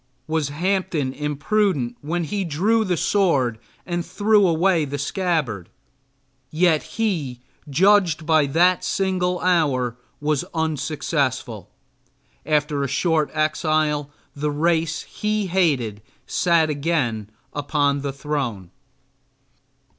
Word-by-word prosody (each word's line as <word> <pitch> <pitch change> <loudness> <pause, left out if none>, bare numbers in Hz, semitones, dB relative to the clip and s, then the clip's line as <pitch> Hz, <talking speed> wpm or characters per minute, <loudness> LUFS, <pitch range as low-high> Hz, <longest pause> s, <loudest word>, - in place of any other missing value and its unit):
Was 155 -2 -1
Hampden 165 -4 -1
imprudent 150 - 0
when 170 +4 -2
he 200 +5 -2
drew 195 +8 +1
the 180 -4 0
sword 140 - +1 0.3
and 175 -1 -2
threw 205 +3 +3
away 170 0 +2
the 145 0 -4
scabbard? 145 - -1 0.8
Yet 160 -1 +3 0.2
he, 160 - -1 0.3
judged 175 0 +3
by 155 -3 +3
that 175 +5 +3
single 180 -2 0
hour, 140 -9 +1 0.2
was 150 -1 0
unsuccessful. 145 - -2 0.8
After 150 -1 +1
a 140 - 0
short 155 +3 +1
exile 155 -1 +1 0.3
the 150 +1 -1
race 160 +1 0
he 210 -1 -2
hated 145 - 0 0.2
sat 165 -3 +2
again 140 -9 -1 0.2
upon 145 -1 0
the 140 0 -2
throne. 135 - -4
155 Hz, 105 wpm, -22 LUFS, 140-180 Hz, 0.8 s, threw